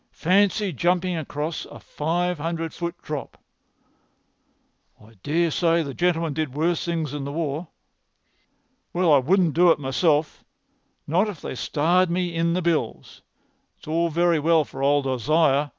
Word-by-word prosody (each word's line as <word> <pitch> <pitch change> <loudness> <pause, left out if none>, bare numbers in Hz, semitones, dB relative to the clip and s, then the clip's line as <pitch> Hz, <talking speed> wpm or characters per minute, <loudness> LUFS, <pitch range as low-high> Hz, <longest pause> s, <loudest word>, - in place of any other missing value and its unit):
"Fancy 200 +2 +2
jumping 180 +4 0
across 155 0 -4
a - - -12
five 175 +2 -2
hundred 165 +1 -3
foot 170 0 -5
drop!" 150 -2 -6 1.6
"I 110 +2 -18
dare 165 - +1
say 165 +1 +2
the 140 -2 -6
gentleman 165 -2 0
did 145 -3 -3
worse 165 +2 0
things 165 -5 -2
in 145 -2 -4
the 140 - -5
war." 155 +1 -3 1.3
"Well, 175 -3 +3
I 140 - +6
wouldn't 170 +3 +2
do 175 +4 +5
it 165 - +4
myself—not 155 +5 -2
if 185 -7 -7
they - - -5
starred 170 +7 +1
me 175 0 -1
in 170 0 0
the 180 +1 -1
bills. 160 -9 -2 0.6
It's - - -18
all 165 +2 +1
very 170 0 +2
well 160 0 +3
for 135 - -9
old 140 0 +2
Isaiah. 145 +2 +2
165 Hz, 150 wpm, -24 LUFS, 150-175 Hz, 1.6 s, I